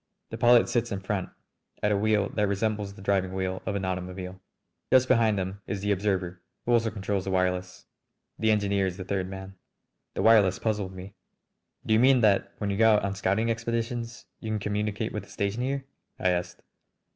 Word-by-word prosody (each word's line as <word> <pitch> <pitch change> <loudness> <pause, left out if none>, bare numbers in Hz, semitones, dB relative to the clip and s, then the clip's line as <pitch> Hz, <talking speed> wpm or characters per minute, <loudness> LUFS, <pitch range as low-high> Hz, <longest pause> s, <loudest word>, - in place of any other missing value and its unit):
The - - -4
pilot 120 0 +6
sits 120 -1 0
in 100 - -2
front 95 -1 -2 0.5
at 105 - +3
a - - +3
wheel 105 0 +2
that 105 -1 0
resembles 100 0 -1
the 95 - -12
driving 95 -2 0
wheel 95 0 -2
of 100 - -1
an 100 -1 -2
automobile. 90 0 -5 0.5
Just 130 0 +5
behind 115 -5 +3
him 95 +2 -4
is 100 - -3
the 105 0 0
observer, 95 -3 -1 0.2
who 120 - 0
also 115 -1 +3
controls 100 -2 -2
the - - -2
wireless. 90 0 -1 0.5
The 110 - +2
engineer 100 -2 +2
is 90 -1 -5
the 95 - -6
third 95 -1 -2
man. 95 0 -8 0.6
The - - -1
wireless 105 -5 +5
puzzled 105 -4 -2
me. 95 +2 -9 0.7
"Do 110 - +2
you 110 - +5
mean 130 0 +5
that 100 -2 +3
when 105 -2 -2
you 100 - -2
go 110 0 +6
out 105 - +1
on 100 - -1
scouting 100 +4 +1
expeditions 115 +1 -3
you 110 - -6
can 110 - 0
communicate 105 0 -2
with - - -3
the - - -21
station 100 +4 -2
here?" 135 +1 -2 0.3
I 90 - +1
asked. 90 0 -3
100 Hz, 200 wpm, -27 LUFS, 95-110 Hz, 0.7 s, pilot